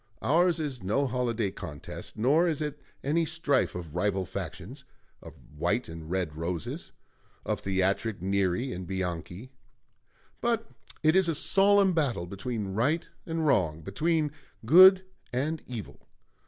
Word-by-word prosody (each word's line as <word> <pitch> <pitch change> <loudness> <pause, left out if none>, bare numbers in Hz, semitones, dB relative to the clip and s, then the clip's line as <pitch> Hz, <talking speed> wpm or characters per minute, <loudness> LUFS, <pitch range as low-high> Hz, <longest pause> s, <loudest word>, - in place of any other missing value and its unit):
Ours 170 +3 +3
is 140 -6 -3
no 110 +10 +1
holiday 120 -5 -1
contest; 85 -8 -8
nor 145 +10 +3
is 160 -4 -1
it 150 -1 -4 0.2
any 155 +5 +2
strife 150 -4 0
of 85 -4 -7
rival 95 0 0
factions - - -7 0.4
of - - -12 0.2
White - - 0
and 80 -1 -9
Red 90 -4 -2
Roses; 85 0 -4 0.5
of - - -1
theatric 95 +2 0
Neri 95 +6 0
and 90 0 -6
Bianchi; 95 +5 -4 0.9
but 230 -1 0 0.3
it 155 +2 +4
is 190 -3 +4
a 165 - +1
solemn 195 +3 +4
battle 140 - 0
between 100 +1 -4
Right 145 - +1 0.2
and 165 -1 -1
Wrong, 80 - +2
between 155 - 0 0.3
Good 185 - +8 0.3
and 145 +5 -1
Evil.... 115 -5 -8
125 Hz, 135 wpm, -28 LUFS, -, 0.9 s, Good